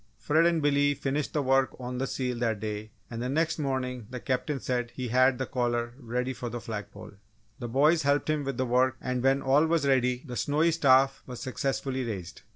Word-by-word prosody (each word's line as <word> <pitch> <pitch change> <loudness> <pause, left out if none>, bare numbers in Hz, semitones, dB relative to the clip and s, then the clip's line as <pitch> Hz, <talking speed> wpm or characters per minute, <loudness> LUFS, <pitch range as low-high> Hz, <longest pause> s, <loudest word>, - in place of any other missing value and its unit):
Fred 160 +3 +3
and 165 -3 +1
Billy 145 0 +3
finished 140 +2 -2
the 150 - 0
work 135 0 +2
on 125 0 -5
the 135 - -1
seal 125 -2 -3
that 115 -3 0
day, 105 0 -5 0.2
and 115 0 -4
the 125 - -2
next 160 +3 0
morning 125 -5 -2
the 125 - -6
Captain 135 +3 -2
said 125 -1 -2
he 125 -2 -4
had 130 +2 +4
the 130 - -2
collar 120 -2 -1
ready 125 +1 -2
for 120 -1 -5
the 120 +1 -5
flag 105 -3 -6
pole. 105 +2 -11 0.5
The 120 - -4
boys 150 +7 +3
helped 140 0 +1
him 155 -1 0
with 135 0 -3
the 130 - 0
work 130 +1 +2
and 125 -1 -2
when 135 +2 +2
all 140 +4 +4
was 165 -3 +1
ready 125 -2 +2
the 125 -3 -6
snowy 150 +8 +2
staff 135 -3 +4
was 125 -2 -7
successfully 130 0 -2
raised. 100 -7 -6
130 Hz, 215 wpm, -28 LUFS, 120-140 Hz, 0.5 s, had